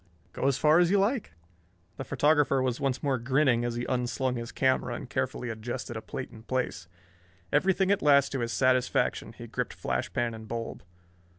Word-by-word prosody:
"Go - - -1
as 140 -1 +2
far 155 +2 +5
as 175 -1 +4
you 200 - +4
like." 210 - 0 0.6
The - - -4
photographer 145 0 +2
was 130 -2 0
once 135 -2 -1
more 135 -3 +1
grinning 130 -1 +2
as 120 -1 -2
he 120 +1 -3
unslung 125 0 -1
his 115 -1 -5
camera 130 -2 +1
and 125 - -7
carefully 130 -2 -2
adjusted 115 +1 -5
a 110 - -4
plate 130 +1 -6
in 110 - -12
place. 115 -8 -3 0.7
Everything 190 +5 +3
at 200 - +2
last 140 -2 +5
to 135 - -2
his 115 -1 -2
satisfaction 130 0 +1
he - - -10
gripped - - -4
flash - - -2
pan 120 -1 -1
and 110 0 -9
bulb. 115 0 -5
130 Hz, 190 wpm, -28 LUFS, 120-145 Hz, 0.7 s, far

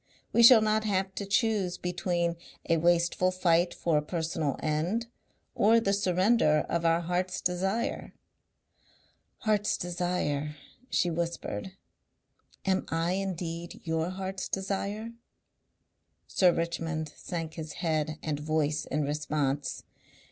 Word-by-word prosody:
We 235 - +5
shall 235 -1 +9
not 215 0 +2
have 190 -2 0
to 200 - -5
choose 200 -4 +1
between 175 -1 -1 0.3
a 165 - +3
wasteful 175 +2 +3
fight 175 -1 +2
for 160 -3 +1
a - - -3
personal 160 -3 -2
end 165 +10 0 0.5
or 225 +3 +5
the 200 -3 +1
surrender 185 -4 +3
of 170 0 -1
our 165 +1 +3
heart's 180 +2 -1
desire." 195 +6 -1 1.3
"Heart's 210 -1 +1
desire," 175 -5 -2 0.3
she 175 - +1
whispered. 170 - -3 0.9
"Am 190 -1 +2
I 165 +1 0
indeed 175 -3 -3
your 160 +1 -1
heart's 190 0 -4
desire?" 200 +3 -3 1.1
Sir 180 -2 +4
Richmond 165 -2 -2
sank 165 -3 -5
his 155 -2 -6
head 155 -3 -1
and 150 -2 -2
voice 155 0 0
in 150 +2 -1
response. 145 -1 -1
175 Hz, 120 wpm, -29 LUFS, 160-190 Hz, 1.3 s, shall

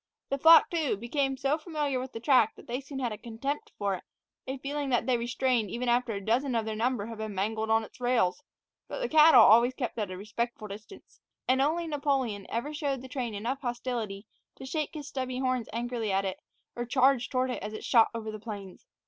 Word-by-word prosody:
The 275 - -1
flock, 325 +3 +8
too, 315 - 0
became 270 +4 -1
so 280 +3 0
familiar 300 -5 -2
with 260 0 -6
the 225 - -6
track 240 -3 +4
that - - -14
they 245 +3 -3
soon 275 0 -8
had 250 -3 -1
a 210 - -6
contempt 275 - -4
for 200 -1 0
it, 185 - -5 0.4
a 265 +1 -3
feeling 280 +1 -3
that 245 -2 +1
they 255 - +2
retained 240 -2 0
even 245 +5 -3
after 240 -1 +2
a 200 -1 -5
dozen 250 +3 +1
of 225 -1 0
their 220 -1 -3
number 230 -1 0
had 225 -1 -8
been 215 -2 -4
mangled 220 +3 -1
on 225 0 +3
its 220 - -13
rails; 245 -3 +1 0.5
but - - -5
the - - -1
cattle 315 -2 +8
always 235 +4 +6
kept 245 -4 -3
it - - 0
at 205 - -2
a 185 - -6
respectful 215 +2 -4
distance, 210 +2 -12 0.3
and 260 +1 +3
only 325 +5 +1
Napoleon 275 -9 -1
ever 240 +7 -3
showed 280 -4 -2
the - - -8
train 245 -5 -3
enough 245 +7 -3
hostility 240 -5 -3 0.3
to - - -10
shake 305 +3 -3
his 295 -2 -6
stubby 255 -2 -3
horns 255 -3 -1
angrily 235 -1 -2
at 195 +1 +1
it 190 - -3 0.4
or 240 - -2
charge 260 0 +3
toward 255 -1 0
it - - -4
as 210 +2 -5
it 215 - -7
shot 230 -3 +5
away 230 - -3
over 220 0 -5
the 215 0 -9
plains. 205 - -8
245 Hz, 230 wpm, -29 LUFS, 220-275 Hz, 0.5 s, flock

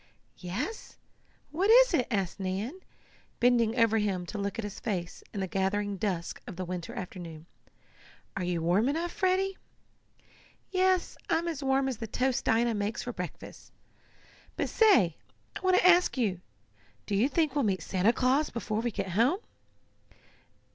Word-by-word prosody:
"Yes, 195 - -5 0.5
what 370 +7 +1
is - - +7
it?" 255 -7 +2
asked 195 -5 -2
Nan, 195 - -3 0.6
bending 235 -1 +3
over 225 -1 +4
him 195 -4 -1
to 210 +4 -6
look 200 0 -3
at 230 - -3
his 205 -1 -6
face 180 -6 -4
in 200 - -4
the 190 - -1
gathering 195 +2 -1
dusk 180 -4 -3
of 195 - -7
the 185 +1 -4
winter 180 -1 -5
afternoon. 170 -4 -7 0.9
"Are 190 - -2
you 175 -2 -1
warm 190 +9 +3
enough, 335 +4 -1
Freddie?" 380 +1 0 1.1
"Yes, 370 -1 +1
I'm 335 0 +1
as 320 -4 -3
warm 270 0 +2
as 260 -4 -2
the 225 - -5
toast 255 +3 0
Dinah 230 +1 +2
makes 205 +1 -2
for 245 - -5
breakfast. 180 -3 -8 0.8
But - - -1
say, 365 - +4 0.4
I - - -4
want 370 -1 +3
to - - +5
ask 355 -4 +5
you 195 -8 0 0.6
do 210 - -4
you 215 +7 +3
think 310 -1 +1
we'll 285 -1 +1
meet 190 -6 0
Santa 190 +4 +2
Claus 260 +5 +2
before 220 -2 -3
we 240 - 0
get 195 -3 -4
home?" 235 - +3
225 Hz, 160 wpm, -29 LUFS, 190-295 Hz, 1.1 s, is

